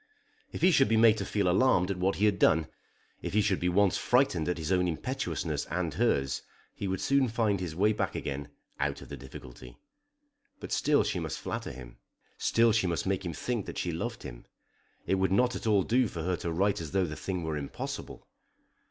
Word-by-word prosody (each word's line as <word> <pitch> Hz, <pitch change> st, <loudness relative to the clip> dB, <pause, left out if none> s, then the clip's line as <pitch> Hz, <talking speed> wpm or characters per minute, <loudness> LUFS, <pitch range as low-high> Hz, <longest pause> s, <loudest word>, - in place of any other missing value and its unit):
If -, -, -6 dB
he 185 Hz, -, +7 dB
should 135 Hz, -5 st, +4 dB
be 110 Hz, -, +3 dB
made 110 Hz, -1 st, +5 dB
to -, -, -2 dB
feel 100 Hz, -3 st, 0 dB
alarmed 90 Hz, -1 st, +3 dB
at 95 Hz, -, -4 dB
what 95 Hz, +2 st, +1 dB
he 105 Hz, -, +2 dB
had 100 Hz, -2 st, +2 dB
done, 80 Hz, 0 st, +4 dB, 0.6 s
if -, -, -5 dB
he 105 Hz, -, +5 dB
should 100 Hz, -3 st, +1 dB
be 90 Hz, -, +1 dB
once 100 Hz, +1 st, +3 dB
frightened 120 Hz, -, +2 dB
at 90 Hz, -, -1 dB
his 80 Hz, +1 st, -3 dB
own 90 Hz, -1 st, +3 dB
impetuousness 90 Hz, -, -3 dB
and 85 Hz, -1 st, -2 dB
hers, 65 Hz, -1 st, +1 dB, 0.3 s
he 100 Hz, -, -4 dB
would 95 Hz, 0 st, -2 dB
soon 135 Hz, -1 st, +2 dB
find 110 Hz, -4 st, 0 dB
his 85 Hz, -4 st, -4 dB
way 105 Hz, +5 st, +3 dB
back -, -, -2 dB
again 70 Hz, 0 st, -4 dB, 0.3 s
out -, -, -2 dB
of -, -, -14 dB
the -, -, -6 dB
difficulty. 65 Hz, -2 st, -11 dB, 0.8 s
But -, -, -8 dB
still 150 Hz, -1 st, +3 dB
she 90 Hz, -, -2 dB
must 80 Hz, -3 st, -4 dB
flatter -, -, -4 dB
him, -, -, -11 dB, 0.4 s
still 115 Hz, 0 st, +3 dB
she 110 Hz, -4 st, +2 dB
must 85 Hz, -1 st, -1 dB
make 95 Hz, 0 st, -1 dB
him 85 Hz, -2 st, -4 dB
think 115 Hz, -, -3 dB
that -, -, -6 dB
she 90 Hz, -, -1 dB
loved 80 Hz, -, -4 dB
him. -, -, -9 dB, 0.6 s
It 95 Hz, -, +1 dB
would 95 Hz, -1 st, +1 dB
not 125 Hz, +5 st, +3 dB
at -, -, -4 dB
all 100 Hz, -3 st, +4 dB
do 125 Hz, +4 st, +2 dB
for 85 Hz, -5 st, -6 dB
her 90 Hz, +1 st, 0 dB
to 85 Hz, -, -3 dB
write 100 Hz, +3 st, +1 dB
as 80 Hz, -3 st, -7 dB
though 95 Hz, -1 st, +2 dB
the 75 Hz, -2 st, -5 dB
thing 90 Hz, 0 st, -4 dB
were 80 Hz, -1 st, -2 dB
impossible. 70 Hz, -2 st, -6 dB
95 Hz, 220 wpm, -29 LUFS, 80-110 Hz, 0.8 s, he